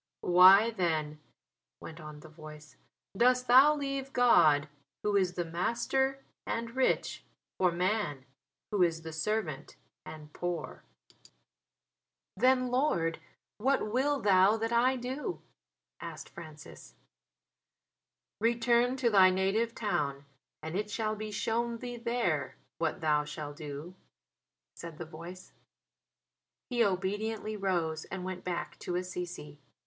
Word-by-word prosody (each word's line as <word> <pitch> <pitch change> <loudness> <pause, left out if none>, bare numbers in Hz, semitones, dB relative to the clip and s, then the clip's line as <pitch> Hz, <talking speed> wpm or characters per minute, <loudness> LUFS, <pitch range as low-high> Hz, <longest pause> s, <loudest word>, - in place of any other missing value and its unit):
"Why 190 +5 +7
then," 160 -7 -1 0.6
went 165 +1 -10
on 150 -1 -10
the - - -12
voice, 155 -1 -13 0.4
"dost 250 +3 +3
thou 265 +5 +7
leave 275 -2 -4
God, 155 -12 +5 0.4
Who 210 -1 +1
is 185 -3 +2
the 175 - -2
Master 265 +10 -1 0.2
and 230 +1 -3
rich, 265 - 0 0.4
for 180 -2 +3
man, 175 -6 -1 0.5
who 205 -3 +1
is 165 -2 +2
the 160 -1 -7
servant 160 -4 -3 0.3
and 150 -1 -11
poor?" 175 -3 -4 1.5
"Then, 255 +3 +3
Lord, 210 - 0 0.4
what 260 -2 +1
will 275 +4 +1
Thou 195 +1 +4
that 225 +1 -2
I 250 +3 +3
do?" 260 +8 -4 0.6
asked - - -8
Francis. 155 -3 -12 1.4
"Return 235 +2 +2
to 245 -3 +1
thy 190 -2 +7
native 195 +5 0
town, 140 -10 -2 0.4
and 160 +2 -5
it 210 +2 -2
shall 215 0 -2
be 215 0 -6
shown 230 +2 -1
thee 245 0 -6
there 230 - -1 0.2
what 165 +2 -1
thou 150 -2 +2
shall 150 0 -7
do," 150 +3 -8 0.8
said 165 -2 -9
the 170 - -6
voice. 170 +4 -11 1.2
He 240 -1 +3
obediently 210 +3 -2
rose 170 -6 -1
and 190 -1 -6
went 185 -1 -5
back 175 -1 -4
to 175 - -4
Assisi. 175 -5 -5
190 Hz, 125 wpm, -30 LUFS, 160-235 Hz, 1.5 s, Why